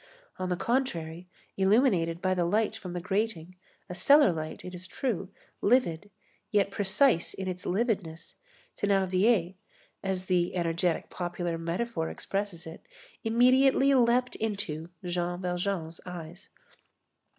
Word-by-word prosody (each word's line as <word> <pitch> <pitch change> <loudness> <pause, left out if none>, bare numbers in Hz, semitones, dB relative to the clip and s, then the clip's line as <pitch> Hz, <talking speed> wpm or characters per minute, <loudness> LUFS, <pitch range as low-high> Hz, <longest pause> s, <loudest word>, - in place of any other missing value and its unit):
On 185 0 -2
the 180 - +1
contrary, 175 -10 -2 0.3
illuminated 190 -5 +2
by 185 0 +2
the 180 -1 +1
light 215 +5 +1
from 185 -5 -7
the 175 - -2
grating, 185 -3 -2 0.3
a - - -6
cellar 280 +5 +6
light, 155 -1 -6
it 180 - -7
is 180 +1 -8
true, 195 -3 -3 0.3
livid, 205 -6 +2 0.4
yet 200 -2 +2
precise 205 - +3
in 190 - -5
its 180 -1 -5
lividness, 190 -5 -2 0.4
Thénardier, 195 -1 +2 0.5
as 190 -1 -2
the 180 -1 +1
energetic 170 0 0
popular 175 -1 -3
metaphor 170 +1 -2
expresses 195 -4 -4
it, 160 0 -9 0.4
immediately 260 +4 +4
"leaped 250 0 +3
into" 185 -7 -3 0.2
Jean 175 0 -2
Valjean's 180 -2 -3
eyes. 175 0 -9
185 Hz, 125 wpm, -29 LUFS, 175-220 Hz, 0.5 s, cellar